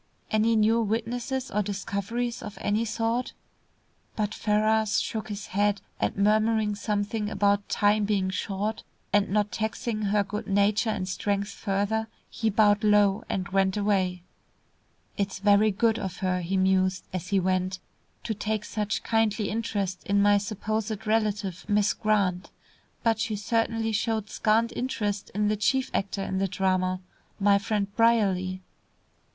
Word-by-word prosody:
Any 220 +1 +3
new 220 +2 +3
witnesses 235 +4 -2
or 210 - +1
discoveries 205 +4 -3
of 210 - -8
any 210 +3 0
sort?" 230 +2 -1 0.8
But 210 -1 -1
Ferrars 215 0 +2
shook 220 -1 -3
his 205 0 -5
head, 205 +1 +1 0.2
and - - -1
murmuring 215 +1 +2
something 210 +1 -2
about 200 -1 +1
time 205 0 +2
being 195 -2 0
short, 205 +3 -3 0.3
and 205 -1 +3
not 210 +1 +1
taxing 220 +2 -2
her 205 +1 +2
good 210 +2 -5
nature 205 +3 +2
and 185 -3 -2
strength 200 +2 -1
further, 205 +2 -1 0.2
he 225 -2 0
bowed 210 0 +3
low, 205 -1 +4
and 185 -2 -2
went 190 0 +1
away. 190 -4 0 0.9
"It's 200 -1 -1
very 205 +2 +4
good 225 +2 +1
of 190 -2 -5
her," 185 -1 0
he 185 +3 -1
mused, 185 0 +2
as 180 -1 -4
he 195 0 +2
went, 185 0 0 0.5
"to 225 - -2
take 215 +1 -2
such 210 -2 -2
kindly 220 -2 +1
interest 200 -4 -2
in 200 0 +3
my 205 0 +5
supposed 215 +1 -3
relative, 210 -4 0
Miss 210 +1 +3
Grant. 200 -4 0 0.5
But 225 -2 +2
she 220 -1 -1
certainly 225 +1 0
showed 220 0 -1
scant 225 +1 +2
interest 210 -5 -2
in 210 0 +1
the 215 - +2
chief 260 +5 +1
actor 195 0 -1
in 190 0 -2
the 195 - +1
drama, 185 -1 0 0.4
my 200 0 +4
friend 200 -1 -2
Brierly." 190 -5 +2
205 Hz, 145 wpm, -27 LUFS, 195-220 Hz, 0.9 s, my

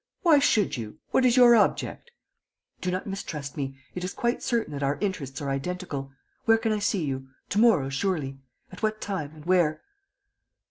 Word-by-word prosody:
"Why 320 -5 +6
should 215 - +2
you? 110 -3 -7
What 260 - +3
is 245 +1 +3
your 240 -1 +8
object?" 225 - +1 0.7
"Do 180 - -1
not 185 +2 -2
distrust 150 -8 -5
me... 135 -2 -4 0.2
it 180 - -5
is 185 - -4
quite 240 +1 0
certain 230 - -1
that 140 - -4
our 140 +1 0
interests 150 -10 -3
are 140 - -2
identical.... 140 -2 -4 0.3
Where 225 0 +6
can 225 0 -1
I 215 - +1
see 200 -4 0
you? 135 -1 -4 0.2
To 205 - +1
morrow, 220 - +5
surely? 135 -2 -2 0.3
At 185 - -11
what 215 0 0
time? 180 -8 -3
And 155 -1 -13
where?" 175 -4 +2
180 Hz, 185 wpm, -27 LUFS, 140-215 Hz, 0.7 s, your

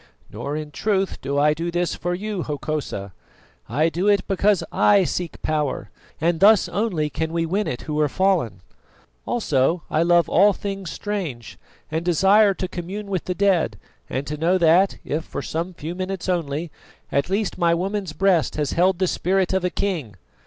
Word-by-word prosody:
Nor 145 +2 -4
in 150 -1 -6
truth 195 +2 -1
do 140 +1 -2
I 150 +1 +4
do 165 +3 -3
this 175 0 -1
for 175 +1 -2
you, 205 0 -3
Hokosa; 145 - -4 0.6
I 150 +8 +2
do 175 +4 -1
it 205 -2 +3
because 195 0 +2
I 200 -2 +4
seek 175 -1 -3
power, 150 -3 -1 0.3
and 165 +1 +1
thus 205 -1 +6
only 175 -4 -1
can 160 0 -2
we 165 0 0
win 195 +6 -1
it 125 - -4
who 150 0 -3
are 150 -1 +2
fallen. 165 - +1 0.7
Also 160 - +1
I 155 - +2
love 170 0 +4
all 200 +3 +5
things 195 -2 -5
strange, 170 - -5 0.3
and 160 +1 -1
desire 195 +4 +4
to 185 - -3
commune 195 +4 -6
with 185 -4 -2
the 180 - -2
dead 180 - +2 0.3
and 135 +2 -3
to 150 +1 -4
know 170 +5 +2
that, 175 +3 +4
if 155 +2 -2
for - - -6
some 170 +3 -3
few 160 +3 -5
minutes 185 0 -4
only, 165 -3 -2 0.4
at 140 +4 0
least 200 -1 -1
my 170 -1 +3
woman's 190 -1 -3
breast 185 0 +2
has 150 -3 -1
held 185 +1 +2
the 185 - +1
spirit 185 +1 0
of 190 -1 +1
a 180 - +1
king. 165 - -3
175 Hz, 180 wpm, -23 LUFS, 155-195 Hz, 0.7 s, thus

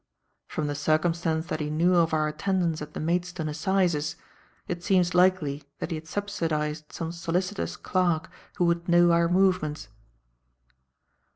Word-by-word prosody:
From 155 - -3
the 145 - -1
circumstance 160 +2 0
that 155 - -3
he 150 -1 -2
knew 170 +4 +2
of 170 -2 +3
our 155 -1 +1
attendance 165 +1 -1
at 150 0 -8
the - - -3
Maidstone 175 0 -1
Assizes, 160 -1 0 0.5
it 175 -1 -4
seems 180 -2 +2
likely 180 -6 +2
that - - -5
he - - -1
had 155 +1 -8
subsidized 155 -6 -2
some 165 -1 -4
solicitor's 180 +4 -2
clerk 175 -4 0 0.3
who 175 - +2
would 170 0 0
know 175 0 +6
our 170 0 +4
movements." 180 - +1
170 Hz, 150 wpm, -27 LUFS, 155-180 Hz, 0.5 s, know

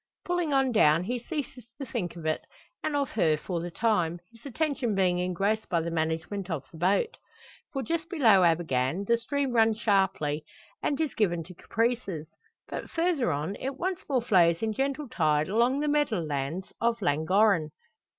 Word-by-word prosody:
Pulling 350 -3 0
on 270 -2 +3
down 165 -7 +4
he 245 +6 -2
ceases 255 -3 -6
to 275 - -4
think 210 -9 -4
of 165 -2 -9
it, 155 0 0 0.4
and 305 - -1
of 280 -2 0
her 160 -8 +2
for 175 +3 -4
the 175 - -4
time, 175 -4 0
his 230 0 -20
attention 275 -5 -1
being 180 -2 +2
engrossed 195 +5 -1
by 170 - +2
the 165 +1 -3
management 165 +4 -2
of 150 -6 -3
the 165 - -12
boat. 195 - +1 0.5
For 270 -3 -3
just 330 +5 -2
below 230 - +5
Abergann 165 0 +1
the 235 +2 +2
stream 280 +3 -1
runs 225 -2 +4
sharply, 190 -9 +1 0.4
and 285 - -1
is 315 -4 0
given 175 -6 +1
to 180 +3 -12
caprices. 220 -5 -1 0.4
But - - -6
further 330 -7 +1
on, 150 +7 -2
it 270 0 -4
once 370 +4 -2
more 255 -4 +1
flows 175 -5 +4
in 220 -1 0
gentle 275 +4 -2
tide 155 -9 +1
along 240 +7 +2
the 300 - 0
meadow 295 -8 +2
lands 150 +4 -3
of 235 0 +1
Llangorren. 175 +2 +3
210 Hz, 180 wpm, -28 LUFS, 170-260 Hz, 0.5 s, below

